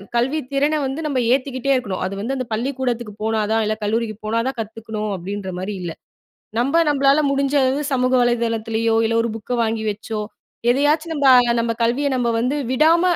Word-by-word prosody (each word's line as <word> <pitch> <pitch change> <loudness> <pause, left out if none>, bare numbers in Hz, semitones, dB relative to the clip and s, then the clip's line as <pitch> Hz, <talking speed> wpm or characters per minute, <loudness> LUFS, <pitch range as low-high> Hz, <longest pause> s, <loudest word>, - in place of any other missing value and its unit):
கல்வி 260 +6 +1
திறன 285 +2 +2
வந்து 270 +3 -3
நம்ம 275 -3 0
ஏத்திக்கிட்டே 265 0 -1
இருக்கணும். 200 -8 -2
அது 190 - -3
வந்து 240 +7 -2
அந்த 255 -1 -3
பள்ளிக்கூடத்துக்கு 240 -2 -2
போனா 220 0 0
தான் 225 0 +2
இல்ல, 215 +1 0
கல்லூரிக்கு 220 +1 -1
போனா 225 +2 0
தான் 265 -1 -3
கத்துக்கணும் 220 -1 -5
அப்பிடின்றமாரி 190 +1 -5
இல்ல. 175 -2 -4 0.7
நம்ப 270 +6 +1
நம்மளால 280 +1 +3
முடிஞ்ச 275 0 0
அளவு 260 +2 +1
சமூக 255 -1 +1
வலைதளத்திலயோ! 230 -1 0
இல்ல 225 - 0
ஒரு 235 - -2
புக்க 225 +2 -7
வாங்கி 225 -1 -1
வச்சோ! 215 +1 -5 0.5
எதையாச்சும் 300 +5 +2
நம்ப 285 -2 +1 0.3
நம்ம 230 0 0
கல்விய 245 +5 +1
நம்ம 245 -2 0
வந்து 255 +5 0 0.2
விடாம 320 +6 +4
240 Hz, 170 wpm, -21 LUFS, 220-275 Hz, 0.7 s, விடாம